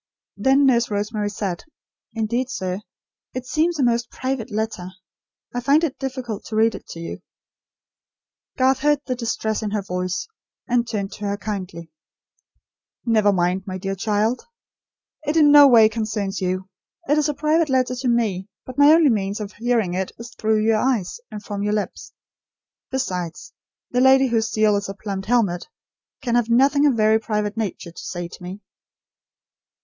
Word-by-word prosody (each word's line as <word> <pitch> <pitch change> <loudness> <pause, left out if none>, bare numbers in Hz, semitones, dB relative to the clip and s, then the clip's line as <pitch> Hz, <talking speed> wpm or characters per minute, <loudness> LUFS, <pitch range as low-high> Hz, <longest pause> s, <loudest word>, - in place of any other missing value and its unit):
Then 270 +1 +3
Nurse 240 -3 +3
Rosemary 210 0 -2
said: 195 -4 -4 0.5
"Indeed, 235 +3 -1
sir, 185 -6 -3 0.6
it 255 0 -4
seems 320 +5 +1
a 280 - +1
most 235 -1 +1
private 260 -2 -3
letter. 215 -4 -3 0.7
I 245 - -1
find 285 +6 +3
it 300 -5 -2
difficult 255 -5 -4
to 220 - -6
read 225 +1 +3
it - - -10
to 165 - -8
you." 165 - -6 1.4
Garth 260 0 +3
heard 295 0 +2
the 255 - -1
distress 225 -3 -2
in 215 - -2
her 205 -1 -2
voice, 180 - -3 0.4
and 240 -1 +1
turned 200 -4 -3
to 210 - -7
her 200 0 -1
kindly. 185 -6 -6 1.1
"Never 215 -3 +4
mind, 185 +1 0
my 185 -1 -4
dear 195 +1 -3
child. 215 +4 0 0.9
It 300 +2 +1
in 295 -2 +6
no 290 -1 +9
way 230 -4 +7
concerns 210 -3 -3
you. 185 +1 -2 0.4
It 295 +2 +3
is 300 0 +1
a 295 - -2
private 310 +1 +2
letter 255 -1 +2
to 255 +1 -2
me; 210 -5 0 0.2
but 255 +2 -7
my 285 +1 +8
only 320 -4 +5
means 200 -1 -1
of 210 -1 -6
hearing 230 -5 0
it 185 +1 -2
is 230 0 -10
through 215 0 +1
your 225 -1 +3
eyes, 245 - 0
and 210 - -8
from 200 -1 -5
your 210 +1 0
lips. 210 -1 -4 0.8
Besides, 180 -11 -4 0.4
the 250 - +2
lady, 265 0 +5
whose 225 -1 +1
seal 215 -1 +3
is 200 0 -4
a 195 - -5
plumed 195 -1 -5
helmet, 210 -7 +1 0.6
can 240 -2 -1
have 240 -1 +2
nothing 280 +5 +4
of 280 - +3
a - - -4
very 220 0 +4
private 210 -1 -2
nature 205 -6 -4
to - - -10
say 175 -1 -5
to 170 - -13
me." 185 +3 -8
220 Hz, 175 wpm, -22 LUFS, 200-255 Hz, 1.4 s, no